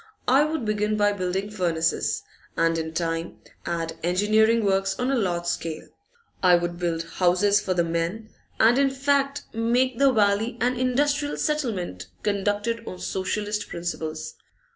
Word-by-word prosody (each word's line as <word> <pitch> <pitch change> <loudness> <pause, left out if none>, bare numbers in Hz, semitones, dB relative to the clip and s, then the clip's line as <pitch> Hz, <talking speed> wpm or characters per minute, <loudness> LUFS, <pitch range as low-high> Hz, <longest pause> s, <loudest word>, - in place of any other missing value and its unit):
I 270 +3 +5
would 310 -5 -2
begin 210 0 0
by 205 0 +3
building 190 +1 -2
furnaces, 170 -5 0 0.3
and 165 0 +2
in 160 0 -4
time 165 0 -2 0.3
add 165 -1 -3
engineering 215 +5 +3
works 195 0 +1
on 250 +1 0
a - - +2
large 175 -7 -1
scale. 165 -2 -3 0.5
I 180 -2 +6
would 175 0 -2
build 165 -2 -1
houses 185 +4 +2
for 185 - -1
the 170 - +3
men, 170 +7 -3 0.3
and 235 +4 +5
in 280 -1 +4
fact 275 +1 0
make 235 +2 +1
that 275 -1 +5
valley 215 +2 +2
an 250 +1 +1
industrial 285 +4 0
settlement 205 - -2 0.2
conducted 205 +3 -1
on 185 - -6
Socialist 205 +3 -3
principles. 160 -2 -4
205 Hz, 145 wpm, -25 LUFS, 175-235 Hz, 0.5 s, I